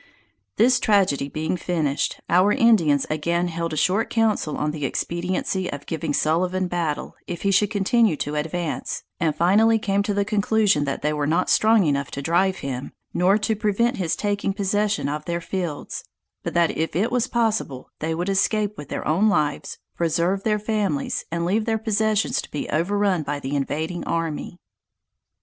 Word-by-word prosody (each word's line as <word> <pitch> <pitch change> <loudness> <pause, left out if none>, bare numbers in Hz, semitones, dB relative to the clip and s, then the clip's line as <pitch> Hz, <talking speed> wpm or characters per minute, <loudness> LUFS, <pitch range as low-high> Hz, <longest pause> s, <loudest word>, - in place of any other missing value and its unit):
This 250 +3 +4
tragedy 185 -10 +2
being 155 +4 -2
finished, 160 -5 -1
our 185 +4 +4
Indians 210 - +4
again 170 +3 0
held 165 0 -3
a 155 - -3
short 190 +8 +1
council 220 -9 0
on 150 0 -1
the 150 -1 -6
expediency 180 +5 -2
of 145 0 -7
giving 160 -1 -3
Sullivan 180 +5 +1
battle, 170 -4 -3
if 175 - -5
he 200 - +2
should 200 +1 +3
continue 215 -1 +2
to 145 +1 -3
advance, 160 +2 -3 0.2
and 160 -4 +1
finally 210 +7 +4
came 200 -2 0
to 205 0 -1
the 200 0 +1
conclusion 210 -6 +2
that 140 - -3
they 150 +1 +1
were 150 -1 -1
not 170 +4 +1
strong 220 -3 +4
enough 140 -2 0
to 140 - -5
drive 185 +4 +2
him, 130 -1 -5 0.2
nor 185 +3 +3
to 215 +1 0
prevent 225 +4 +1
his 170 -3 0
taking 205 -1 -1
possession 205 -3 0
of 150 +1 -3
their 170 0 -2
fields: 170 -3 -4 0.4
but - - -5
that 170 -1 +3
if 160 -1 -2
it 215 +7 +1
was 250 0 +1
possible 220 - -1
they 160 +1 -2
would 175 +2 -2
escape 205 +1 +1
with 145 - -9
their - - -4
own 190 +8 +3
lives, 150 -7 -1 0.2
preserve 170 +3 0
their 210 0 +1
families, 205 -9 -1
and 170 0 -1
leave 210 +5 +1
their 225 -1 +1
possessions 220 -1 +1
to - - -12
be 150 - -4
overrun 195 +2 +1
by 145 -1 -3
the 140 +1 -4
invading 160 +5 -2
army. 165 +1 -3
180 Hz, 175 wpm, -23 LUFS, 155-210 Hz, 0.4 s, This